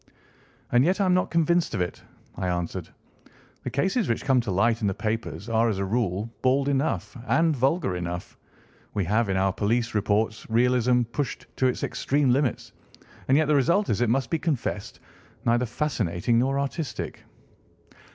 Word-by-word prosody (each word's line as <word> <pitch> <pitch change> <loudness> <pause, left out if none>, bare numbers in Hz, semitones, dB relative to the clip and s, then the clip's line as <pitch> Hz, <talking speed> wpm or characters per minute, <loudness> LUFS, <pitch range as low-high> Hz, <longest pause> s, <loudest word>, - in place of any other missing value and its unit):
"And 120 +1 +5
yet 185 +6 +2
I 200 - +3
am 185 - +3
not 180 - +2
convinced 170 -3 +2
of 95 - -1
it," 90 - -3 0.3
I 95 0 -2
answered. 85 -1 -3 0.7
"The - - -4
cases 190 - 0
which 115 - -1
come 130 -3 +4
to 115 - -6
light 110 +5 +2
in 105 - +1
the 95 - -1
papers 110 -4 -3
are, 115 0 +2
as 105 - -1
a 100 - -1
rule, 100 -1 -1
bald 135 +2 +2
enough, 140 +1 -1
and 165 -1 +3
vulgar 135 - +1
enough. 90 0 -5 0.6
We 100 - 0
have 110 +4 +1
in 95 - +1
our 95 0 +2
police 115 +3 0
reports 110 +1 0
realism 125 +1 +3
pushed 125 +4 -4
to 130 - +3
its 125 - -2
extreme 140 -2 +1
limits, 130 0 0 0.6
and 135 - +4
yet 155 - +3
the 150 - +3
result 170 +9 +2
is, 110 - 0
it 120 - +2
must 125 0 0
be 165 - +1
confessed, 130 -10 -3 0.5
neither 120 +1 +2
fascinating 115 - 0
nor 135 +3 +1
artistic." 140 +2 -4
120 Hz, 175 wpm, -26 LUFS, 105-140 Hz, 0.7 s, And